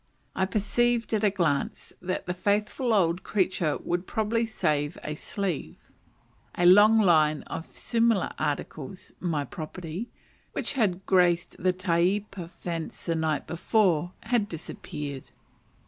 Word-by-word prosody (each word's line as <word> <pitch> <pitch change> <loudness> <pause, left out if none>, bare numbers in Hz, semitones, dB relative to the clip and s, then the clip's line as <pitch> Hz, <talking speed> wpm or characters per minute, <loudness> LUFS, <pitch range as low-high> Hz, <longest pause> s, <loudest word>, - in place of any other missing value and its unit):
I 190 - +1
perceived 230 +4 +1
at 215 -1 +1
a 210 - +5
glance 170 -8 -1
that 185 +1 -3
the 180 - -2
faithful 210 +6 0
old 180 -4 +3
creature 185 -6 0
would 175 +1 -3
probably 225 +1 0
save 150 -8 0
a 150 - -3
sleeve. 160 - -4 0.7
A 175 - +2
long 205 +5 +8
line 155 -5 +4
of 165 - -6
similar 230 -4 +1
articles, 150 +4 -4
my 155 -5 -1
property, 175 +3 -6 0.4
which - - -1
had 195 -8 0
graced 175 -2 +3
the 185 +1 +3
taiepa 185 +1 0
fence 170 -3 -6
the 170 - +1
night 160 -2 0
before, 175 -1 +1
had 225 -3 0
disappeared. 150 -3 -6
180 Hz, 130 wpm, -27 LUFS, 165-210 Hz, 0.7 s, long